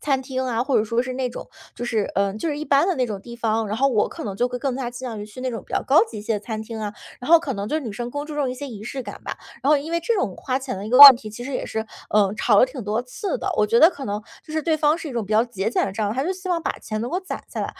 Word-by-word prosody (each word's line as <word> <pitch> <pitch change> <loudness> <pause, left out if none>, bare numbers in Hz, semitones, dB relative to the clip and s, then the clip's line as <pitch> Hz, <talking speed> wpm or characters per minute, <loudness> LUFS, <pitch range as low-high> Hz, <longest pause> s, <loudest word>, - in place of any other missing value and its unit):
餐 270 -3 0
厅 260 -1 -3
啊， 240 -2 0
或 265 -2 +2
者 215 - +1
说 230 +3 0
是 255 0 -5
那 255 -1 -1
种， 240 - -8 0.3
就 240 - -5
是 220 -3 0
呃， 200 0 +1
就 320 +9 -2
是 295 - -2
一 305 - -4
般 285 +3 +3
的 380 - +1
那 255 - +1
种 210 -5 -5
地 235 +2 -10
方。 225 -1 0
然 210 +2 -3
后 275 +2 +3
我 220 -5 +2
可 - - -8
能 195 -2 -4
就 245 - +2
会 250 0 -4
更 260 0 -2
加 255 -3 -3
倾 250 +1 -6
向 220 -3 -6
于 210 - -6
去 215 +4 -11
那 255 0 -2
种 230 - -5
比 - - -14
较 - - +1
高 300 +9 +5
级 225 - -9
一 - - -7
些 220 +1 -1
的 - - -1
餐 220 0 -5
厅 225 0 -7
啊， 210 -1 -3 0.3
然 250 - -7
后 335 - +9
可 280 -6 -3
能 200 0 -4
就 310 +4 0
女 235 - -5
生 235 +4 -5
更 290 +2 -4
注 305 - -8
重 285 -3 0
一 250 - -3
些 280 +2 -7
仪 215 -5 -8
式 260 +2 -5
感 - - -9
吧。 - - -5 0.3
然 275 - 0
后 300 - +6
因 290 +3 -5
为 335 - +1
这 460 +8 0
种 225 - -1
花 255 0 -2
钱 260 -6 -5
的 200 - -6
一 - - -6
个 250 - +4
话 285 -1 +15
题， 230 -3 -7
其 240 +3 -8
实 270 +2 -6
也 - - -3
是， 220 0 -3 0.3
呃， 205 -2 +3
吵 210 -2 +3
了 - - +8
挺 255 -4 -8
多 215 +3 -1
次 380 - -4
的。 390 - -2
我 210 - +3
觉 230 +2 +3
得 325 - +8
可 285 -7 -8
能， 205 +1 -3 0.2
就 310 - -9
是 315 -1 -1
对 320 0 +1
方 300 +1 +3
是 330 -2 -6
一 270 - -7
种 230 -3 -2
比 215 - -4
较 220 +2 +4
节 215 -4 -2
俭 230 - +1
的 - - -3
这 210 - -5
样， 205 +1 -1
还 265 - 0
是 365 - 0
希 370 0 -8
望 335 -2 0
把 - - 0
钱 215 -1 -4
能 235 - -3
够 355 - 0
攒 375 - -6
下 - - -7
来。 - - -1
250 Hz, 390 characters per minute, -23 LUFS, 220-285 Hz, 0.3 s, 话